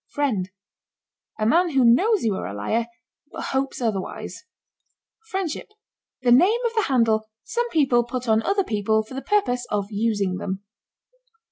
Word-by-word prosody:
FRIEND. 225 -11 -1 0.9
A 215 - -1
man 340 +10 +4
who 270 -5 +3
knows 390 - +4
you 220 -3 +1
are 190 - -4
a 100 - -6
liar, 225 - -1 0.4
but - - -6
hopes 270 0 -1
otherwise. 225 - -4 0.8
FRIENDSHIP. 380 -6 -3 0.6
The 245 - +3
name 370 - +5
of 465 - 0
the 440 -2 +1
handle 225 -4 +2
some 480 0 -2
people 270 - +3
put 250 +1 -5
on 220 0 +4
other 395 - +1
people 220 - +1
for 220 - -13
the 270 - -4
purpose 250 -13 0
of 205 0 -2
using 205 -3 0
them. 190 +1 -4
240 Hz, 155 wpm, -23 LUFS, 215-315 Hz, 0.9 s, name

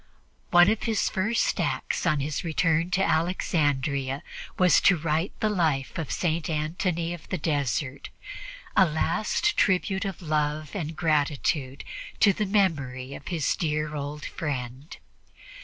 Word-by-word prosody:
One 175 0 +7
of 220 - -1
his 225 -3 +1
first 215 +5 0
acts - - -1
on 155 -4 +2
his 145 +2 -2
return 165 0 +1
to 190 +1 +1
Alexandria 145 -6 0 0.3
was 180 -2 +5
to 195 - +5
write 160 +3 -1
the 215 - +3
life 155 - 0
of 160 - -4
St. 165 -2 -1
Antony 165 +2 -1
of 175 - -11
the 185 - -1
Desert, 140 - -2 0.7
a - - +7
last 215 - 0
tribute 190 +1 +2
of 195 -3 -4
love 150 -1 -1
and 160 -4 -3
gratitude 145 -3 0 0.4
to 200 -3 +6
the 210 +1 -1
memory 140 -10 0
of 140 - -10
his 165 -5 0
dear 150 -1 -1
old 145 +1 -5
friend. 135 -1 -5
155 Hz, 140 wpm, -26 LUFS, 145-180 Hz, 0.7 s, One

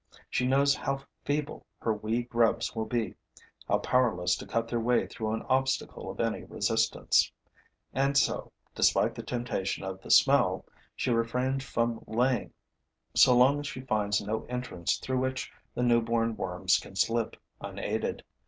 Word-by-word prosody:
She 125 - +1
knows 140 +2 +4
how 135 -1 -3 0.2
feeble 145 +1 -2
her 110 - 0
wee 110 +3 -1
grubs 115 -1 +1
will 110 -1 -2
be, 115 -1 -1 0.5
how - - +3
powerless 90 -9 +2
to - - -9
cut 115 0 -1
their 120 0 -1
way 120 +2 +2
through 110 -2 -4
an 110 - -3
obstacle 130 0 -1
of - - -8
any - - -1
resistance; - - +1 0.6
and 140 +1 +2
so, - - +1 0.2
despite - - +3
the - - -6
temptation 120 -7 -3
of 95 0 -5
the - - -12
smell, - - +4 0.3
she 130 - -1
refrains 125 +4 0
from 115 -4 -1
laying 120 +1 +1 0.6
so 125 -1 +6
long 135 +4 +5
as 145 - -5
she 130 - -6
finds 105 -5 +1
no 110 +2 -3
entrance 125 -9 -2
through 130 -1 -2
which 130 0 -2 0.2
the 125 - 0
newborn 115 -1 +2
worms 90 -1 +1
can - - -12
slip 115 +3 +1 0.2
unaided. - - -3
120 Hz, 155 wpm, -29 LUFS, 110-130 Hz, 0.6 s, so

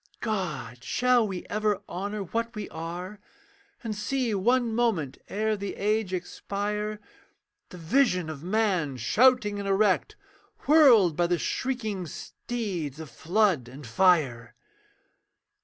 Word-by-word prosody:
God! 150 - -4
shall 250 - +2
we 185 -3 -5
ever 210 -1 -1
honour 200 +3 -4
what 230 +5 -3
we 210 -2 -5
are, 175 +5 -6 0.6
And 220 -2 -3
see 235 +2 -1
one 235 +4 +2
moment 220 - 0
ere 215 +1 0
the 200 -1 -5
age 210 -1 0
expire, 205 +3 -3 0.7
The 180 - -10
vision 180 - +2
of 155 -3 -7
man 185 -8 0
shouting 210 - +3
and 200 - -4
erect, 195 0 +2 0.5
Whirled 245 - +6
by 175 +1 +2
the 175 0 +1
shrieking 220 -6 -3
steeds 175 - -5
of 155 -5 -8
flood 175 - +1
and 135 +3 -11
fire? 125 -4 +2
200 Hz, 125 wpm, -27 LUFS, 170-220 Hz, 0.7 s, Whirled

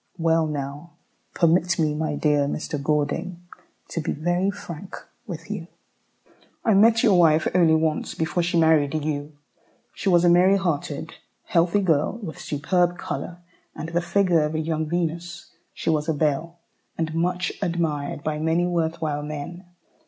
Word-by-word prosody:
Well 165 -1 +2
now 145 +3 -5 0.4
permit 175 +1 +3
me, 155 -2 +1
my 150 0 -2
dear 145 -1 +2
Mr. 150 0 -3
Gordon, 165 +5 -1 0.5
to 165 - -3
be - - -2
very 175 +5 0
frank 190 -2 -7 0.3
with 170 0 -7
you. 195 -5 -5 1.0
I 220 - +4
met 225 +4 +5
your 200 -7 +5
wife 160 -2 +4
only 170 -3 +5
once 160 -1 -1
before 170 +2 0
she 170 0 0
married 160 -2 +3
you. 145 -1 -4 0.6
She 195 - -2
was 175 -1 +4
a - - +5
merry 180 +3 +5
hearted, 160 -4 -3 0.3
healthy 175 +4 +2
girl, 160 -5 +2
with 195 -9 -8
superb 175 +4 0
colour, 175 0 -6 0.3
and 155 - -5
the 170 +1 0
figure 180 -2 +2
of 150 +1 -1
a - - 0
young 160 0 -1
Venus. 170 +1 -3 0.2
She - - -2
was 155 0 0
a 160 - +1
belle, 155 +3 -1 0.4
and 160 -1 -2
much 180 +2 0
admired 165 -4 -2
by 150 -1 -2
many 160 +2 +1
worth 165 -2 -1
while 150 -2 -1
men. 150 +5 -6
165 Hz, 160 wpm, -24 LUFS, 155-175 Hz, 1.0 s, met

